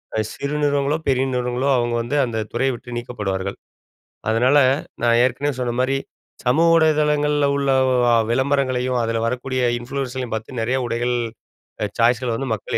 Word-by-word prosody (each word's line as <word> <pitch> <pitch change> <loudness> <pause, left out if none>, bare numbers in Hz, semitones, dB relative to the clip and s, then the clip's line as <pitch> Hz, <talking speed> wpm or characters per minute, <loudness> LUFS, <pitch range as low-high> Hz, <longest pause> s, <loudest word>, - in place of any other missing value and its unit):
அ - - +1
சிறு 140 +1 -4
நிறுவனங்களோ, 145 +1 +1
பெரிய 130 0 +2
நிறுவனங்களோ, 125 +2 -1
அவுங்க 120 -1 0
வந்து 140 +5 -2
அந்த 115 -2 -4 0.2
துறையை 130 +2 +1
விட்டு 120 0 -9
நீக்கப்படுவார்கள். 100 -5 -4 0.7
அதனால 125 +5 +3 0.5
நான் 115 0 +4
ஏற்கனவே 135 +2 -1
சொன்ன 120 - -1
மாரி, 135 +1 +1 0.5
சமூக 160 +7 +4
ஊடகதளங்கள்ல 150 -2 +2
உள்ள 140 -1 +1 0.2
வ 125 -1 +2 0.3
விளம்பரங்களையும் 130 -1 +1
அதில 115 0 -1
வரக்கூடிய 125 +2 -2 0.2
இன்ஃப்ளூயன்ஸ்ர்களையும் 130 -1 -4
பாத்து 110 +3 -6
நெறைய 125 +4 0
உடைகள், 120 +1 -1 0.7
அ 105 - +1
சாய்ஸ்கள் 120 0 +2
வந்து 135 -2 -4
மக்கள் 100 - -3
125 Hz, 145 wpm, -21 LUFS, 120-140 Hz, 0.7 s, நான்